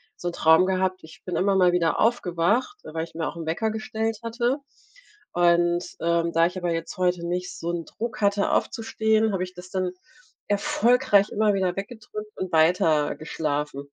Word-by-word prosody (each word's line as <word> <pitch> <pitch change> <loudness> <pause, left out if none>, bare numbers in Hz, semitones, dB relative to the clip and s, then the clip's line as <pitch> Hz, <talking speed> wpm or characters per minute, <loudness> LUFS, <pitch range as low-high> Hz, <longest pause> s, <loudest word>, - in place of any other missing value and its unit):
so 175 - -4
'n - - -7
Traum 160 +3 +5
gehabt. 185 -1 -1
Ich 160 - -15
bin 180 - -3
immer 195 +1 +2
mal 180 -2 +5
wieder 170 -2 +1
aufgewacht, 220 - +1
weil 160 +1 -4
ich 165 - -10
mir 165 - -2
auch - - -6
'n 165 -1 -6
Wecker 170 +8 -1
gestellt 220 0 -3
hatte. 240 +3 0 0.8
Und, 175 0 +3
ähm, 170 0 +1
da 165 0 +4
ich 180 +2 -5
aber 175 -2 -1
jetzt 165 0 -4
heute 180 -2 0
nicht 180 +1 -3
so 170 - -4
'n 170 -1 -3
Druck 235 +1 -6
hatte 200 0 +2
aufzustehen, 220 -1 +1
habe 185 -2 -1
ich 185 0 -10
das 180 +1 -11
dann 185 -2 -1 0.6
erfolgreich 240 -3 +3
immer 215 0 +2
wieder 185 -2 0
weggedrückt 210 0 -7
und 185 -1 -4
weiter 160 -2 +3
geschlafen. 150 -3 -3
185 Hz, 180 wpm, -25 LUFS, 170-215 Hz, 0.8 s, Traum